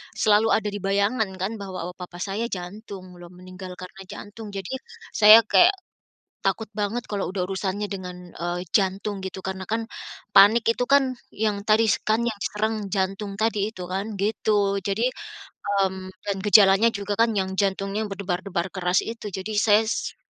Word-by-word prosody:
selalu 215 Hz, +1 st, +4 dB
ada 210 Hz, -1 st, -1 dB
di 205 Hz, -, -5 dB
bayangan 200 Hz, +4 st, +1 dB
kan 195 Hz, +4 st, -4 dB
bahwa, 185 Hz, -3 st, -5 dB
oh, -, -, -22 dB
papa 180 Hz, -1 st, -7 dB
saya 210 Hz, +4 st, -2 dB
jantung 185 Hz, -2 st, -8 dB
loh 175 Hz, -, -10 dB
meninggal 185 Hz, +1 st, -10 dB
karena 185 Hz, +1 st, -10 dB
jantung 215 Hz, +3 st, -9 dB
jadi, 195 Hz, -2 st, -5 dB, 0.4 s
saya 215 Hz, +2 st, +8 dB
kayak, 355 Hz, -, +5 dB, 0.7 s
takut 200 Hz, +3 st, 0 dB
banget 215 Hz, +3 st, -2 dB
kalau 200 Hz, -3 st, -3 dB
udah 185 Hz, -1 st, -2 dB
urusannya 195 Hz, +2 st, -2 dB
dengan, 180 Hz, -3 st, -8 dB
eee, 175 Hz, +1 st, -4 dB
jantung 195 Hz, 0 st, 0 dB
gitu 190 Hz, 0 st, -6 dB
karena 190 Hz, 0 st, -4 dB
kan, 225 Hz, +4 st, -2 dB, 0.5 s
panik 210 Hz, +4 st, +7 dB
itu 245 Hz, -, -1 dB
kan 270 Hz, -2 st, +4 dB, 0.2 s
yang 210 Hz, -1 st, -1 dB
tadi 220 Hz, +1 st, +5 dB
s 210 Hz, -, +1 dB
kan 215 Hz, +1 st, +2 dB
yang 230 Hz, -, -1 dB, 0.2 s
serang 215 Hz, +1 st, -1 dB, 0.2 s
jantung 195 Hz, +1 st, -2 dB
tadi 215 Hz, -2 st, 0 dB
itu 185 Hz, -5 st, -8 dB
kan 190 Hz, +3 st, -3 dB
gitu. 205 Hz, 0 st, +1 dB
Jadi, 205 Hz, +5 st, 0 dB, 0.6 s
mmm, 190 Hz, -2 st, 0 dB, 0.2 s
dan 200 Hz, -1 st, -1 dB
gejalanya 205 Hz, +1 st, +6 dB
juga 205 Hz, 0 st, -3 dB
kan 230 Hz, -1 st, +3 dB
yang 190 Hz, 0 st, -1 dB
jantungnya 195 Hz, +2 st, -1 dB
berdebar-debar 190 Hz, -2 st, -3 dB
keras 180 Hz, -1 st, +1 dB
itu 225 Hz, -2 st, -6 dB
jadi 190 Hz, +3 st, -5 dB
saya 215 Hz, 0 st, +5 dB
s 220 Hz, -, -3 dB
200 Hz, 165 wpm, -24 LUFS, 190-215 Hz, 0.7 s, saya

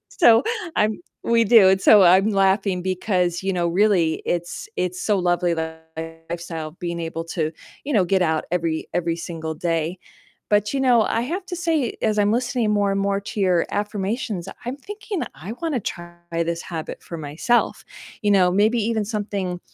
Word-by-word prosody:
so 235 Hz, -, +5 dB, 0.3 s
I'm 215 Hz, +1 st, +1 dB, 0.2 s
we 230 Hz, 0 st, +3 dB
do, 215 Hz, -3 st, +7 dB
and 190 Hz, 0 st, +3 dB
so 205 Hz, -3 st, +7 dB
I'm 190 Hz, +4 st, +5 dB
laughing 195 Hz, -1 st, +2 dB
because, 185 Hz, -2 st, 0 dB
you 195 Hz, -, 0 dB
know, 175 Hz, -2 st, 0 dB
really 175 Hz, -3 st, +2 dB
it's 175 Hz, 0 st, -3 dB
it's 180 Hz, 0 st, -2 dB
so 210 Hz, -2 st, +2 dB
lovely, 175 Hz, -1 st, +1 dB
that 160 Hz, 0 st, -6 dB, 0.4 s
lifestyle, 165 Hz, -2 st, -5 dB
being 170 Hz, 0 st, -5 dB
able 165 Hz, 0 st, -4 dB
to, 160 Hz, -2 st, -2 dB, 0.3 s
you 290 Hz, -, -3 dB
know, 205 Hz, -5 st, +4 dB
get 190 Hz, +1 st, +2 dB
out 160 Hz, -2 st, +1 dB
every 165 Hz, -2 st, -1 dB
every 170 Hz, -1 st, 0 dB
single 165 Hz, -2 st, -5 dB
day, 165 Hz, +2 st, -2 dB, 0.5 s
but, 210 Hz, 0 st, +2 dB
you 275 Hz, -, 0 dB
know, 250 Hz, -4 st, +4 dB
I 225 Hz, +1 st, 0 dB
have 350 Hz, +10 st, -3 dB
to 365 Hz, -2 st, -5 dB
say, 320 Hz, -7 st, 0 dB
as 215 Hz, -1 st, +2 dB
I'm 205 Hz, 0 st, +3 dB
listening 240 Hz, -1 st, 0 dB
more 205 Hz, -1 st, +2 dB
and 195 Hz, -, 0 dB
more 200 Hz, 0 st, +1 dB
to 200 Hz, +1 st, -6 dB
your 180 Hz, -3 st, +2 dB
affirmations, 205 Hz, 0 st, -2 dB, 0.2 s
I'm 250 Hz, +3 st, -4 dB
thinking 410 Hz, +3 st, -5 dB
I 185 Hz, +7 st, -7 dB
wanna 320 Hz, -7 st, -1 dB
try 175 Hz, -3 st, -6 dB, 0.2 s
this 170 Hz, 0 st, -1 dB
habit 160 Hz, -3 st, -6 dB
for 170 Hz, -, -7 dB
myself, 160 Hz, +11 st, 0 dB, 0.4 s
you 205 Hz, -, +2 dB
know, 185 Hz, -3 st, +5 dB
maybe 215 Hz, +5 st, +3 dB
even 220 Hz, -1 st, 0 dB
something 200 Hz, -4 st, -3 dB
195 Hz, 180 wpm, -22 LUFS, 170-220 Hz, 0.5 s, do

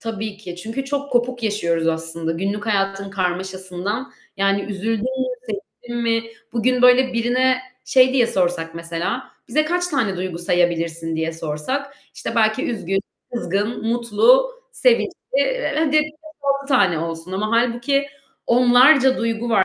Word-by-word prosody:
Tabii 220 Hz, -2 st, -5 dB
ki, 180 Hz, -4 st, -9 dB
çünkü 225 Hz, +8 st, -4 dB
çok 285 Hz, +1 st, -3 dB
kopuk 245 Hz, 0 st, 0 dB
yaşıyoruz 170 Hz, -6 st, 0 dB
aslında 165 Hz, 0 st, -2 dB
günlük 200 Hz, +5 st, -3 dB
hayatın 195 Hz, -1 st, 0 dB
karmaşasından 185 Hz, +4 st, -3 dB, 0.2 s
yani 195 Hz, 0 st, +2 dB
üzüldün 215 Hz, +2 st, -2 dB
mü, 260 Hz, 0 st, -1 dB, 0.2 s
sevindin 235 Hz, +3 st, -6 dB
mi, 230 Hz, 0 st, +1 dB, 0.3 s
bugün 250 Hz, +2 st, +1 dB
böyle 250 Hz, +1 st, +6 dB
birine 255 Hz, +2 st, +2 dB, 0.3 s
şey 260 Hz, 0 st, +5 dB
diye 245 Hz, -3 st, +4 dB
sorsak 175 Hz, -4 st, -1 dB
mesela, 170 Hz, +9 st, -4 dB, 0.2 s
"Bize 305 Hz, +6 st, +2 dB
kaç 355 Hz, +3 st, 0 dB
tane 230 Hz, -, 0 dB
duygu 180 Hz, -2 st, -4 dB
sayabilirsin?" 170 Hz, -2 st, 0 dB
diye 160 Hz, +1 st, -1 dB
sorsak 165 Hz, -, -3 dB, 0.2 s
işte -, -, -5 dB
belki 220 Hz, +2 st, +2 dB
üzgün, 195 Hz, -4 st, -1 dB, 0.3 s
kızgın, 210 Hz, +2 st, -2 dB
mutlu, 240 Hz, -, +4 dB, 0.2 s
sevinçli, -, -, +3 dB, 0.3 s
eee, -, -, 0 dB
hadi 310 Hz, -2 st, +1 dB
5-6 300 Hz, -3 st, -4 dB
tane 195 Hz, -, +3 dB
olsun 165 Hz, +2 st, -5 dB
ama 210 Hz, +3 st, -1 dB
hâlbuki 240 Hz, +4 st, +1 dB, 0.4 s
onlarca 255 Hz, +3 st, +5 dB
duygu 230 Hz, 0 st, -2 dB
var 195 Hz, -4 st, +4 dB
225 Hz, 135 wpm, -21 LUFS, 185-255 Hz, 0.4 s, böyle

